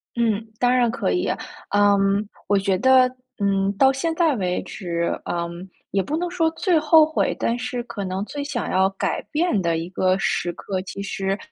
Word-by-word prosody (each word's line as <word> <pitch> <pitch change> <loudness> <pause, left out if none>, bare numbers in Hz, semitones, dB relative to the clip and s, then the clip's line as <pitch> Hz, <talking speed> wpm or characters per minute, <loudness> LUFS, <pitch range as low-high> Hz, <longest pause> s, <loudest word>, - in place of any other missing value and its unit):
嗯， 225 -2 +1 0.2
当 250 0 +3
然 240 -2 +3
可 225 - -1
以。 90 0 0 0.4
嗯， 200 0 +3 0.2
我 205 0 +3
觉 195 -1 +1
得， 260 +1 +5 0.3
嗯， 195 -1 +1
到 270 0 +6
现 325 +5 -1
在 320 -5 +2
为 180 -2 -1
止， 170 -2 -3
嗯， 170 +2 -4 0.2
也 195 - +2
不 300 +10 -2
能 350 +1 -2
说 330 -3 +1
最 325 0 +1
后 310 0 +6
悔， 315 - 0
但 235 +1 0
是 250 -1 -4
可 210 -4 -6
能 190 +1 -3
最 285 +3 -5
想 275 -5 -3
要 190 +1 +3
改 195 - -2
变 305 - +1
的 170 -1 0
一 165 +1 -4
个 185 0 +2
时 175 -2 0
刻， 190 -2 -4
其 195 +1 -7
实， 195 0 -2
205 Hz, 205 characters per minute, -23 LUFS, 190-265 Hz, 0.4 s, 到